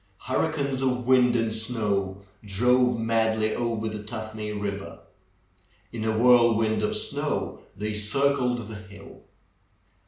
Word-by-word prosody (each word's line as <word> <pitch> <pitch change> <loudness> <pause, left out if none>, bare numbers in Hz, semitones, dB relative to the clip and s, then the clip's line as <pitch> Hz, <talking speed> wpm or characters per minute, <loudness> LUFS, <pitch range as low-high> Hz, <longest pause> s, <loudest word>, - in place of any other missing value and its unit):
Hurricanes 140 -1 -1
of 125 -2 0
wind 125 -1 +4
and 115 -2 +1
snow 105 -4 -1 0.2
drove 125 +4 +2
madly 110 -1 +1
over 115 -2 -2
the 105 -1 -4
Tuthmay 110 0 -6
Eiver. 100 -1 -5 0.9
In 110 -2 -4
a 110 0 0
whirlwind 115 -2 +4
of 105 - 0
snow - - -2 0.2
they 105 +2 -3
circled 125 +2 0
the 110 -1 -7
hill. 100 -1 -13
110 Hz, 120 wpm, -26 LUFS, 105-125 Hz, 0.9 s, wind